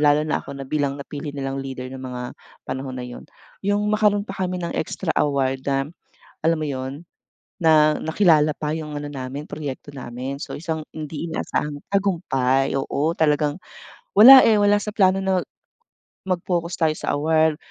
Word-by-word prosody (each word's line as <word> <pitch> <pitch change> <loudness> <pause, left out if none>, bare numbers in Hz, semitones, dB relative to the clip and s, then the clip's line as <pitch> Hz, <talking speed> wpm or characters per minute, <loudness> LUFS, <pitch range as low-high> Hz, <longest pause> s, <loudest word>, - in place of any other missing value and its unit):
lalo 150 0 +4
na 155 - -1
ako 140 - -9
na 135 - -6
bilang 140 0 -1
napili 145 +1 -7
nilang 135 0 -3
leader 130 -1 -6
ng 130 - -7
mga 125 -1 -6 0.4
panahon 130 0 -5
na 125 - -5
yun 125 0 -10 0.3
yung 205 +1 0
magkaroon 210 -1 +2
pa 195 - -7 0.2
kami 185 - -3
ng 175 -1 -4
extra 160 +1 -2
award 135 -2 +1
na 135 0 +1 0.6
alam 165 0 +2
mo 155 - -2
yun? 135 +4 -5 0.6
Na 155 -1 +5
nakilala 160 -2 +4
pa 150 0 -3
yung 150 -2 -5
ano 145 - -6
namin 140 +1 -6
proyekto 145 -1 -7
namin. 130 +2 -6
So - - -6
isang 160 -1 -3
hindi 155 +1 -6
inaasahan 150 -2 -2 0.2
tagumpay 135 -10 +1
oo 145 +4 0
talagang, 150 0 +1 0.5
wala 260 +6 +10
eh, 215 -2 +4
wala 205 0 +4
sa 210 +1 -3
plano 195 -2 +3
na 190 -1 +2 0.8
mag-focus 175 -2 -2
tayo 155 -1 +2
sa - - -3
award 155 +1 +2
150 Hz, 165 wpm, -22 LUFS, 135-175 Hz, 0.8 s, wala